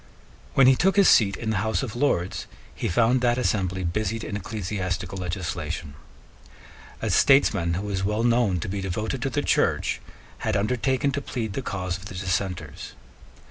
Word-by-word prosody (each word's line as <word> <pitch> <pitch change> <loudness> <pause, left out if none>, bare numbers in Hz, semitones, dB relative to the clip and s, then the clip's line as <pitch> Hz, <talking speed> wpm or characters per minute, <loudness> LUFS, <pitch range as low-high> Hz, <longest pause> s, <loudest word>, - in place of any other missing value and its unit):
When 135 - +6
he 130 +1 +7
took 190 +8 +2
his 200 -2 +6
seat 100 -6 +5
in 110 -1 -2
the 110 - 0
House 110 +4 0
of 120 -4 -5
Lords, 110 -10 0 0.3
he - - -3
found 120 +6 +3
that 120 -1 +2
assembly 95 -6 0
busied 105 +5 -2
in 105 - -4
ecclesiastical 95 -2 -3
legislation. 85 -4 -4 1.1
A - - 0
statesman 100 -11 +4
who 95 +4 -3
was 95 -2 -2
well 105 +3 0
known 115 -6 +2
to - - -4
be 100 +1 -3
devoted 110 +7 -3
to 135 - 0
the 145 +3 -1
Church - - +1 0.4
had - - 0
undertaken 125 +6 +1
to 140 +1 -2
plead 115 -6 -4
the 135 - -2
cause 95 -6 -3
of 95 - -12
the 95 - -8
Dissenters. 95 0 -3
105 Hz, 175 wpm, -25 LUFS, 95-120 Hz, 1.1 s, he